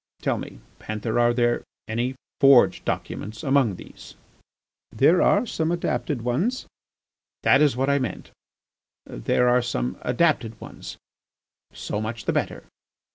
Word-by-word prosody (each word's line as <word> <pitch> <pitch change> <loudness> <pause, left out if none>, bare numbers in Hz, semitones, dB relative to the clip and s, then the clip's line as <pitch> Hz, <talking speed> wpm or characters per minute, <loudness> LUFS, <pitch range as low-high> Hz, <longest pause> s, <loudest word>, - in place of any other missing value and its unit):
Tell - - 0
me, - - -9 0.2
Panther, 110 +2 -3
are 120 0 +4
there 120 0 +1 0.2
any 120 +4 -2 0.2
forged 135 -3 +5
documents 105 +1 -4
among 135 -7 +2
these?" - - -13 0.8
"There 165 +6 +4
are 205 +4 +3
some 160 -7 -1
adapted 150 -6 -2
ones." 175 - -1 0.8
"That - - +5
is 145 -5 +3
what 135 +1 0
I 140 0 +2
meant. 125 -8 -5 0.7
There 125 - 0
are 125 0 +4
some 65 - -3
adapted 125 -4 0
ones. - - -10 0.7
So 105 - -4
much 110 +1 -5
the - - 0
better. - - -2
125 Hz, 130 wpm, -24 LUFS, 115-140 Hz, 0.8 s, forged